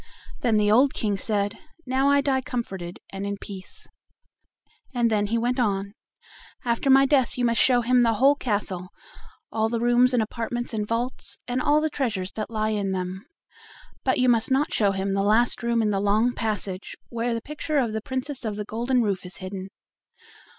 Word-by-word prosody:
Then 230 Hz, -3 st, +2 dB
the 210 Hz, 0 st, +3 dB
old 260 Hz, +5 st, +4 dB
King 210 Hz, -2 st, 0 dB
said: 205 Hz, +1 st, -1 dB, 0.3 s
"Now 265 Hz, +2 st, +2 dB
I 285 Hz, 0 st, +4 dB
die 270 Hz, -2 st, +1 dB
comforted 195 Hz, -9 st, -5 dB, 0.2 s
and 195 Hz, 0 st, -4 dB
in 200 Hz, 0 st, -3 dB
peace"; 195 Hz, -2 st, -8 dB, 1.1 s
and 235 Hz, -1 st, +2 dB
then 205 Hz, -1 st, +1 dB
he 230 Hz, +3 st, 0 dB
went 245 Hz, +3 st, 0 dB
on: 200 Hz, -3 st, 0 dB, 0.7 s
"After 235 Hz, +3 st, 0 dB
my 270 Hz, +1 st, +7 dB
death 265 Hz, -4 st, +2 dB
you 245 Hz, -, +1 dB
must 230 Hz, -1 st, +3 dB
show 245 Hz, -2 st, +5 dB
him 250 Hz, +1 st, +3 dB
the 230 Hz, -1 st, +3 dB
whole 270 Hz, +6 st, +5 dB
castle, 200 Hz, -8 st, -2 dB, 0.6 s
all 220 Hz, 0 st, 0 dB
the 230 Hz, 0 st, -1 dB
rooms 240 Hz, +2 st, +4 dB
and 230 Hz, -, +3 dB
apartments 235 Hz, +2 st, -4 dB
and 210 Hz, -1 st, -2 dB
vaults, 240 Hz, +3 st, -3 dB
and 250 Hz, +1 st, -1 dB
all 295 Hz, +3 st, +3 dB
the 315 Hz, -, 0 dB
treasures 215 Hz, -10 st, -2 dB
that 215 Hz, -1 st, -5 dB
lie 215 Hz, -1 st, -1 dB
in 200 Hz, -2 st, -1 dB
them; 185 Hz, +1 st, -4 dB, 0.8 s
but 260 Hz, -, +2 dB
you 255 Hz, -, +3 dB
must 230 Hz, -2 st, +3 dB
not 270 Hz, +3 st, +1 dB
show 205 Hz, -2 st, +3 dB
him 195 Hz, 0 st, -2 dB
the 195 Hz, -, +1 dB
last 220 Hz, +5 st, +3 dB
room 235 Hz, -1 st, +1 dB
in 210 Hz, -, +1 dB
the 195 Hz, -, 0 dB
long 215 Hz, +4 st, +2 dB
passage, 205 Hz, -4 st, -3 dB
where 235 Hz, 0 st, -1 dB
the -, -, -1 dB
picture 300 Hz, +2 st, -3 dB
of 240 Hz, -5 st, +1 dB
the 220 Hz, -, -2 dB
Princess 260 Hz, +3 st, -4 dB
of 215 Hz, -3 st, -3 dB
the 210 Hz, 0 st, -4 dB
Golden 240 Hz, +3 st, 0 dB
Roof 200 Hz, -3 st, -1 dB
is 180 Hz, 0 st, -8 dB
hidden. 190 Hz, 0 st, -7 dB
230 Hz, 195 wpm, -25 LUFS, 205-250 Hz, 1.1 s, my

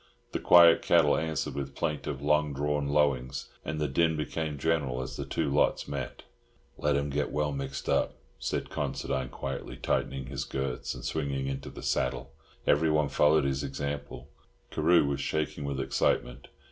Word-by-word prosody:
The -, -, -2 dB
quiet 85 Hz, -1 st, +7 dB
cattle 80 Hz, -4 st, +4 dB
answered 80 Hz, -3 st, -2 dB
with 70 Hz, -1 st, -5 dB
plaintive, 75 Hz, -3 st, -3 dB
long 75 Hz, 0 st, +2 dB
drawn 75 Hz, 0 st, 0 dB
lowings, 70 Hz, -3 st, +1 dB
and 75 Hz, -1 st, -3 dB
the 75 Hz, -, +1 dB
din 80 Hz, +4 st, +2 dB
became 75 Hz, -1 st, -3 dB
general 70 Hz, -4 st, 0 dB
as 65 Hz, +2 st, -5 dB
the 70 Hz, -1 st, -5 dB
two -, -, -1 dB
lots 75 Hz, -, +2 dB
met. -, -, -5 dB, 0.5 s
"Let 75 Hz, -1 st, +1 dB
'em 70 Hz, 0 st, 0 dB
get 75 Hz, +1 st, -1 dB
well 75 Hz, 0 st, 0 dB
mixed 70 Hz, -2 st, -5 dB
up," -, -, +1 dB, 0.2 s
said -, -, -3 dB
Considine 65 Hz, -2 st, -2 dB
quietly, 70 Hz, -2 st, -5 dB
tightening 65 Hz, +1 st, -1 dB
his 65 Hz, 0 st, -4 dB
girths, 65 Hz, -2 st, -3 dB
and -, -, -8 dB
swinging 70 Hz, -1 st, -2 dB
into 70 Hz, 0 st, -4 dB
the -, -, -10 dB
saddle. 65 Hz, -, -1 dB, 0.3 s
Everyone 75 Hz, -1 st, +3 dB
followed 75 Hz, 0 st, +4 dB
his 70 Hz, -1 st, -1 dB
example. 70 Hz, -1 st, -5 dB, 0.4 s
Carew 85 Hz, +1 st, +4 dB
was 70 Hz, -1 st, -1 dB
shaking 75 Hz, 0 st, -2 dB
with 70 Hz, -1 st, -2 dB
excitement. 60 Hz, -2 st, 0 dB
70 Hz, 160 wpm, -29 LUFS, 70-75 Hz, 0.5 s, quiet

